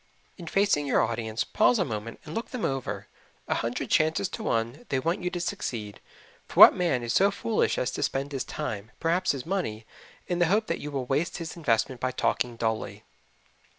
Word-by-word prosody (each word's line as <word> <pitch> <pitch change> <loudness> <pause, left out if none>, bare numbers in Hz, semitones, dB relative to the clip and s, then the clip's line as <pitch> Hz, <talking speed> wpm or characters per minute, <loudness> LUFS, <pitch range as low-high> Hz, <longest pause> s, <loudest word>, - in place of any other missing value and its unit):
In 175 -4 -10
facing 195 -6 +2
your - - +3
audience, 115 -1 -2
pause 245 - +3
a 185 - +1
moment 110 -1 -5
and 155 - -7
look 225 +3 -3
them 250 -4 -3
over 135 -1 -3 0.4
a - - +1
hundred 115 +1 -3
chances 160 +5 +3
to 225 - -6
one 115 - -1
they 135 - +1
want 165 +8 -1
you 180 - -1
to 180 -1 -4
succeed, 115 - -4 0.5
for - - -3
what - - +12
man 165 -9 0
is 120 0 -1
so 195 +1 +5
foolish 215 +2 0
as 125 - 0
to - - -4
spend 135 +2 -1
his 135 -3 -2
time, 110 -8 -5
perhaps 175 +2 +1
his 135 -3 -6
money, 160 - -2 0.4
in 175 -1 -1
the 175 - +4
hope 210 +5 +2
that - - -2
you 150 - -5
will 135 -3 -3
waste 145 +6 0
his 165 -3 -6
investment 130 -5 0
by 130 - +1
talking 125 -1 0
dully? 110 -1 -2
145 Hz, 205 wpm, -27 LUFS, 120-180 Hz, 0.5 s, what